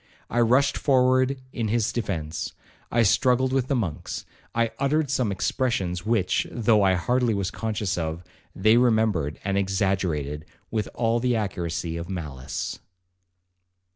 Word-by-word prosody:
I 120 - +1
rushed 125 +4 +3
forward 130 0 +3
in 115 -3 -1
his 110 0 +1
defence—I 100 +3 -3
struggled 125 +5 +3
with 130 -2 +1
the 140 - +1
monks—I 115 - -3
uttered 145 +1 +1
some 125 -6 +1
expressions 95 -4 -1
which, 110 -5 +1
though 110 -3 +3
I 95 -1 +4
hardly 120 +5 +1
was 100 -2 -1
conscious 105 -4 -2
of, 80 +1 -3 0.3
they 110 +4 +4
remembered 110 - +2
and 100 0 +1
exaggerated 95 -7 -1 0.3
with 110 -2 -1
all 115 0 +1
the 125 0 +1
accuracy 85 - -2
of 85 +2 -6
malice. 75 -8 -5
110 Hz, 130 wpm, -25 LUFS, 90-120 Hz, 0.3 s, I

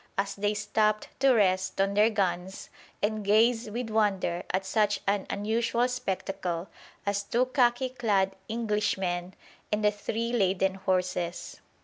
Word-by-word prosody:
as 195 0 0
they 205 +1 -1
stopped 215 +1 0
to 270 0 +5
rest 190 -5 +2
on 195 +1 +2
their 210 +2 +5
guns 190 -3 -2 0.3
and 215 0 0
gaze 225 +3 +3
with 230 +1 -4
wonder 195 -5 +1
at 190 +1 -1
such 210 +1 +1
an 200 0 0
unusual 230 +4 0
spectacle 195 -7 -3 0.4
as 200 0 0
two 235 +5 +1
khaki 255 -1 +2
clad 205 -6 +1
Englishmen 195 -5 -1 0.4
and 210 0 +1
the 210 - +5
three 225 +3 -3
laden 190 -3 +2
horses. 180 -2 -2
205 Hz, 135 wpm, -28 LUFS, 190-225 Hz, 0.4 s, to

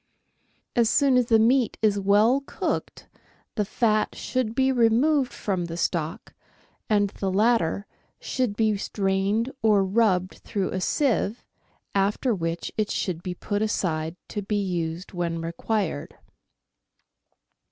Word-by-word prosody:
As 235 -3 +3
soon 275 0 +3
as 250 -2 +3
the 225 -2 +5
meat 240 +2 +3
is 205 -2 +3
well 210 +7 +4
cooked - - -3 0.5
the 210 - 0
fat 215 +1 +1
should 255 -3 -2
be 265 +1 +3
removed 255 +4 +3
from 185 -4 -2
the 165 0 -6
stock, 165 -1 -2 0.6
and 205 -2 +2
the 195 -2 -3
latter 205 -2 +2 0.3
should 250 -6 -2
be 215 -1 +2
strained 195 +4 0
or 210 -3 +4
rubbed 190 -3 +1
through 195 -2 -3
a 185 - -2
sieve, 240 -2 0 0.5
after 205 +5 +1
which 165 -3 -3
it 215 -1 0
should 175 -3 -2
be 180 0 -5
put 205 +3 -3
aside 165 -6 -1
to 205 - -3
be 205 +1 -2
used 175 -2 -3
when 170 -2 -2
required. 165 0 -3
205 Hz, 130 wpm, -25 LUFS, 185-230 Hz, 0.6 s, the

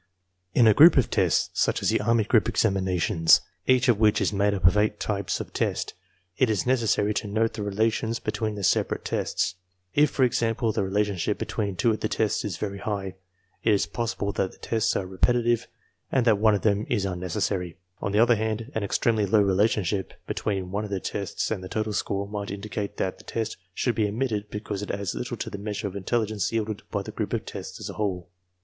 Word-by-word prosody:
In 120 - +6
a 110 - +7
group 160 +7 +8
of 130 - +2
tests, - - +2
such - - +1
as - - +3
the - - +1
army 115 +1 +3
group 115 +1 +3
examinations, 95 -5 +3 0.3
each 130 0 +4
of 120 -4 +4
which 110 -1 +4
is - - 0
made 100 +1 +2
up 95 -3 -2
of 90 - +6
eight 105 0 +1
types 100 -2 -2
of - - -7
test, - - -1 0.5
it 130 - +4
is 105 -4 0
necessary 115 -4 +2
to 105 - -2
note 110 +2 0
the 110 - -5
relations 110 +3 0
between 110 -1 -3
the 100 - -6
separate - - +1
tests. - - -1 0.4
If, 150 0 +4
for 135 - +1
example, 115 -2 +1
the - - -1
relationship 100 -2 0
between 100 -3 -3
two 115 +6 +2
of 110 - -2
the 110 - -2
tests 110 -2 0
is 100 -6 -3
very 100 0 -4
high, 100 -3 -3 0.5
it 110 - +2
is 100 - +2
pos 115 -1 -3
sible 100 0 -2
that 95 - 0
the - - -18
tests 115 0 0
are 95 - -1
repetitive 120 +5 +1 0.4
and 130 -3 +2
that 110 -4 +4
one 110 -1 +4
of 100 - -3
them 105 0 +1
is 105 -5 +1
un 90 -2 -3
necessary. 90 0 -2 0.2
On 100 - -2
the 105 - +1
other 120 +2 +5
hand, 110 +3 -3
an 110 - -2
extremely 105 +1 +1
low 105 +1 +4
relationship 100 0 +1
between 95 -3 -2
one 100 +2 -1
of 105 - -5
the 100 -1 -2
tests 100 +3 -3
and 100 -4 -2
the 95 - -7
total 110 +1 -2
score 100 0 -2
might 105 -1 -5
indicate 100 0 -5
that 95 - -2
the - - -14
test 110 -1 -3 0.2
should 120 - +1
be 110 -3 +1
omitted 105 -1 -2
because 105 -1 -5
it 105 - -6
adds 100 -2 -2
little - - -4
to - - -5
the 100 - -6
measure 105 0 -4
of 100 - -8
intelligence 105 0 -1
yielded 110 -2 -2
by - - -2
the - - -7
group - - -4
of - - -1
tests - - -7
as - - -6
a - - -6
whole. 90 -4 -2
105 Hz, 220 wpm, -26 LUFS, 100-110 Hz, 0.5 s, group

